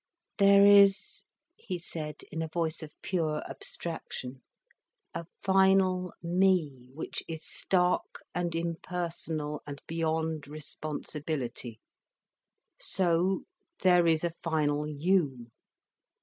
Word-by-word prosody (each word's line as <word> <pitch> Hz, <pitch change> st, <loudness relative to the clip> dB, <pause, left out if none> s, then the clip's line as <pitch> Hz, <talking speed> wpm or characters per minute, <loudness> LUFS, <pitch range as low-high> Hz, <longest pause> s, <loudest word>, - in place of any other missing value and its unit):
"There 200 Hz, 0 st, +7 dB
is," 205 Hz, -, +5 dB, 0.4 s
he 180 Hz, -, -4 dB
said, 155 Hz, -3 st, -7 dB
in 160 Hz, -, -3 dB
a 160 Hz, -, -2 dB
voice 165 Hz, 0 st, -2 dB
of 155 Hz, -1 st, -10 dB
pure 160 Hz, -5 st, -1 dB
abstraction; 135 Hz, -6 st, -6 dB, 0.7 s
"a 170 Hz, -, -5 dB, 0.2 s
final 190 Hz, -2 st, +4 dB
me 170 Hz, -8 st, +1 dB
which 160 Hz, -, -4 dB
is 160 Hz, -1 st, -6 dB
stark 180 Hz, -1 st, +1 dB
and 175 Hz, -2 st, -1 dB
impersonal 165 Hz, -3 st, -3 dB
and 140 Hz, -1 st, -6 dB
beyond 160 Hz, -2 st, -1 dB
responsibility. 145 Hz, -5 st, -5 dB, 1.0 s
So 180 Hz, +1 st, +1 dB, 0.4 s
there 180 Hz, -2 st, +5 dB
is 160 Hz, -1 st, +3 dB
a 170 Hz, -1 st, -1 dB
final 150 Hz, -2 st, 0 dB
you. 145 Hz, -6 st, 0 dB
165 Hz, 100 wpm, -30 LUFS, 150-180 Hz, 1.0 s, There